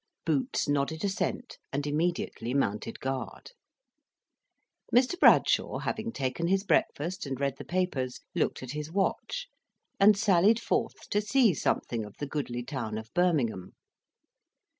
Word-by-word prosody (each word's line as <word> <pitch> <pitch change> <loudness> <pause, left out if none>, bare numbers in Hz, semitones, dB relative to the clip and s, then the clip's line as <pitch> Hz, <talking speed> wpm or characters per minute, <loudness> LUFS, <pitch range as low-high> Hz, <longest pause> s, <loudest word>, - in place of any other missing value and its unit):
Boots 260 - 0
nodded 145 +2 0
assent, 200 +5 -3
and 140 +1 -2
immediately 150 -5 -1
mounted 105 -4 -1
guard. 135 - -5 1.4
Mr. 250 +6 +4
Bradshaw - - +5
having 225 +1 -3
taken 140 - -2
his 195 +2 +2
breakfast 180 -3 0
and 135 -1 -4
read 140 -1 -1
the - - -6
papers, 165 -9 -2
looked - - -1
at 125 - -6
his 150 +1 -5
watch, 200 - -1 0.5
and 205 +1 +7
sallied 205 +1 +4
forth 230 - -2
to 205 - +2
see 220 -1 +4
something 120 -4 -1
of 105 -1 -11
the 145 - -3
goodly 135 -4 -3
town 120 -5 -4
of 110 0 -9
Birmingham. 140 - +1
150 Hz, 135 wpm, -29 LUFS, 130-195 Hz, 1.4 s, and